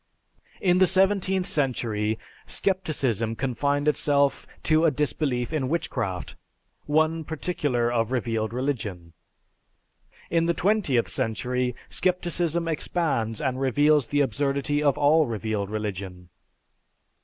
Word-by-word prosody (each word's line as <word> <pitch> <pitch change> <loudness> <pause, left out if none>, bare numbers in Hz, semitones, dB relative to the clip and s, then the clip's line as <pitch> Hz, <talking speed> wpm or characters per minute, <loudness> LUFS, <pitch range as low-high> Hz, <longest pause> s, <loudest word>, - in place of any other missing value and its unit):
In 180 -1 +3
the 185 - +6
seventeenth 190 -1 +2
century, 115 -8 0 0.3
scepticism 135 - 0
confined 140 +4 -1
itself 140 -2 +2 0.2
to 155 0 +3
a - - +6
disbelief 140 -2 -1
in 135 -5 -1
witchcraft, 120 - -3 0.5
one 160 +2 +2
particular 145 -7 -1
of 115 -1 0
revealed 115 -3 -1
religion; 110 -10 -3 1.2
in 165 0 +2
the 170 - +1
twentieth 185 - +1
century, 125 +1 -1
scepticism 175 -2 0
expands 145 -8 -1
and 130 -2 -2
reveals 145 0 +3
the 145 0 +1
absurdity 140 +3 0
of 145 -2 +2
all 150 +1 +4
revealed 110 -3 -3
religion. 95 -4 -5
140 Hz, 110 wpm, -25 LUFS, 115-160 Hz, 1.2 s, the